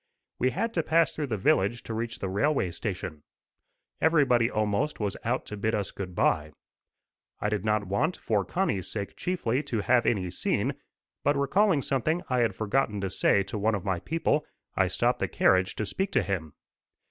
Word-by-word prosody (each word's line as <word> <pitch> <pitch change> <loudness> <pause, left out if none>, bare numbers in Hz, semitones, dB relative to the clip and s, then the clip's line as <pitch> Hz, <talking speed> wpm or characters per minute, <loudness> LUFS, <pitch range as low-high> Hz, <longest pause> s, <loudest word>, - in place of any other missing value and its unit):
We 130 - +3
had 230 - -2
to 165 - +1
pass 165 +1 +2
through 150 -2 -3
the 110 -4 -2
village 100 +4 +2
to 115 - -5
reach 115 +2 -3
the 95 - -3
railway 100 - +1
station. 90 -4 -5 0.8
Everybody 135 -8 +4
almost 110 +6 0
was 105 -3 -1
out 125 +3 -1
to 105 - -6
bid 110 +2 0
us 100 -2 -2
good 90 -3 -6
bye. 75 -2 +1 0.9
I 105 - 0
did 105 -3 -1
not 105 -1 +1
want, 125 - 0
for 105 -3 0
Connie's 140 - -1
sake 100 -2 -5
chiefly, 145 -9 -1
to 125 -7 -2
have 120 +2 +3
any 95 -6 +1
scene, - - 0 0.5
but 145 +1 +3
recalling 155 +2 +3
something 155 +6 0
I 125 - +2
had 115 -5 +1
forgotten 110 0 0
to 95 -2 -2
say 100 - +3
to 100 +2 -5
one 110 +2 +2
of 100 -1 -5
my 95 -3 0
people, 155 - 0 0.3
I - - +3
stopped - - +1
the - - 0
carriage 95 0 +2
to 110 - -2
speak 190 - -2
to 125 - +3
him. 85 -5 -3
110 Hz, 190 wpm, -28 LUFS, 100-140 Hz, 0.9 s, Everybody